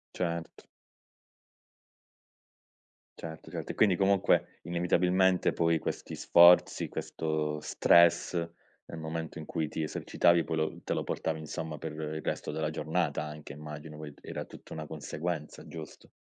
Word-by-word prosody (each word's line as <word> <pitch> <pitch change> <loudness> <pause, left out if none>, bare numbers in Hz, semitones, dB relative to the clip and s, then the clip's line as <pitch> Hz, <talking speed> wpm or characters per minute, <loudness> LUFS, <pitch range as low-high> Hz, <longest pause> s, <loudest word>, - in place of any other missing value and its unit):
Certo. 85 -2 -3 2.6
Certo, 80 -1 -8
certo. - - -4
E - - -13
quindi, 100 -5 +4
comunque, 100 0 +2
inevitabilmente, 90 +1 +2
poi 85 -1 +2
questi - - -4
sforzi, 85 +1 +6
questo 75 -1 -2
stress, 85 +2 +4 0.5
nel 80 - -8
momento 80 +1 -4
in - - -7
cui 80 +1 -2
ti 80 - -4
esercitavi, 85 +2 +2
poi 80 - -2
lo 80 0 -1
te - - -1
lo - - -1
portavi, 80 -1 -2
insomma, 80 0 -5
per 80 +1 -5
il 80 0 -4
resto - - -3
della 80 0 -1
giornata 80 -2 -1
anche 75 -1 -8
immagino, 75 +1 -8
poi 75 -2 -8
era - - -5
tutta - - -13
una 80 -1 -5
conseguenza, 75 +1 -5
giusto? 80 -3 -10
80 Hz, 135 wpm, -30 LUFS, 75-85 Hz, 2.6 s, sforzi